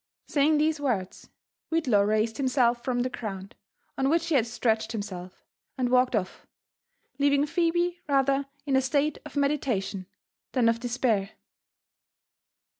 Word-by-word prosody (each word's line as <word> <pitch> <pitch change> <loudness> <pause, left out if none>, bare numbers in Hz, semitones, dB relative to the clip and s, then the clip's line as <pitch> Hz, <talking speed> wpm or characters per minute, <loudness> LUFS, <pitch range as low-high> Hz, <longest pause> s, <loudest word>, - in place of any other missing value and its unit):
Saying 300 +1 +2
these 310 0 +1
words, 225 -10 -3 0.4
Whitlaw 265 -11 +3
raised 215 +1 +1
himself 250 -3 +2
from 250 -2 0
the 255 - -1
ground, 195 -5 -6 0.5
on 270 0 +2
which.he 335 +1 +1
had 240 -5 +3
stretched 225 -1 0
himself, 185 -4 -7 0.3
and 250 -2 0
walked 250 -1 +3
off, 185 -4 -3 0.7
leaving 285 0 +3
Phebe 345 +2 0
rather 275 0 +2 0.2
in 275 -2 +1
a 265 - +4
state 285 +2 0
of - - -15
meditation 255 -10 -1 0.5
than 250 -3 +3
of 230 0 0
despair. 235 -5 0
255 Hz, 130 wpm, -27 LUFS, 220-285 Hz, 0.7 s, a